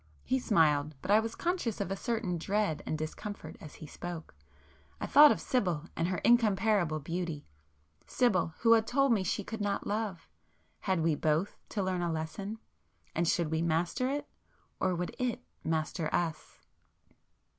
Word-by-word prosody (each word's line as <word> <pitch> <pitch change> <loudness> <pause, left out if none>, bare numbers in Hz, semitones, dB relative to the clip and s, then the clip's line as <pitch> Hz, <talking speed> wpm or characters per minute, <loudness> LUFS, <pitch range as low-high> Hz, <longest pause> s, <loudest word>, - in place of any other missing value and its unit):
He 260 - +1
smiled,—but 155 - +2
I 210 - +7
was 225 0 -3
conscious 345 - -1
of 195 -2 -2
a - - 0
certain 210 -5 -2
dread 200 -2 0
and 155 - -1
discomfort 155 +7 -6
as 155 - -10
he 155 - -10
spoke. 165 - -7 0.7
I - - -2
thought 295 0 +8
of - - 0
Sibyl 180 - 0
and 165 - 0
her 185 0 -1
incomparable 210 -8 +3
beauty——Sibyl, 150 - -3
who 230 - +5
had 225 -1 +3
told 275 +2 +3
me 200 -4 +1
she 190 +3 -1
could 225 +2 -6
not 200 -1 -1
love,—had 195 -2 -4
we 160 0 +2
both 155 +5 0
to 205 - -1
learn 185 -1 -1
a 170 -1 0
lesson? 180 +7 -4 0.6
And 170 +1 0
should 165 -1 +1
we 160 0 +1
master 170 +9 0
it?—or 265 -8 -4
would 175 +1 -4
it 250 -2 -1 0.2
master 160 0 -1
us? 160 -3 -2
180 Hz, 155 wpm, -31 LUFS, 160-220 Hz, 0.7 s, thought